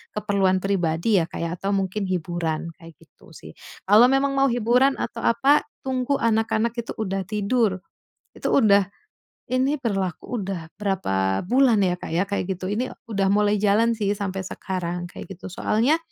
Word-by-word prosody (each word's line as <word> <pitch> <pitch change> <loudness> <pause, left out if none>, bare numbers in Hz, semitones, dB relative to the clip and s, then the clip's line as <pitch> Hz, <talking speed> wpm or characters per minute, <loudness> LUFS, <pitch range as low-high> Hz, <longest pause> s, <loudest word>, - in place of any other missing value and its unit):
keperluan 200 -3 +1
pribadi 190 +1 +1
ya, - - -1
Kak, - - -7
ya, 170 - -2
atau 195 - -2
mungkin 195 +1 -1
hiburan, 170 -2 -2
kayak 165 -1 -13
gitu - - -21
sih. - - -11 0.4
Kalau 215 +5 +7
memang 270 +1 +2
mau 275 0 +4
hiburan 245 +4 +3
atau 230 - -4
apa, 280 +5 +3 0.2
tunggu 260 +1 0
anak-anak 225 0 +1
itu 235 0 -4
udah 195 -3 -2
tidur, 210 -1 0 0.6
itu - - -3
udah 200 -6 +5 0.7
ini 260 +3 +2
berlaku 195 0 -2
udah 185 -5 -5
berapa 95 - 0
bulan 245 +1 +3
ya, 180 -1 +1
Kak, - - -7
ya, 175 - +2
kayak 195 -2 -2
gitu. 185 +2 -5
Ini 245 +5 -2 0.2
udah 200 -2 +1
mulai 210 0 +3
jalan 210 +3 +3
sih 205 -2 0
sampai 195 -2 -4
sekarang, 175 -2 -4
kayak - - -9
gitu. 185 - -9
Soalnya, 235 - +1
200 Hz, 165 wpm, -23 LUFS, 185-230 Hz, 0.7 s, Kalau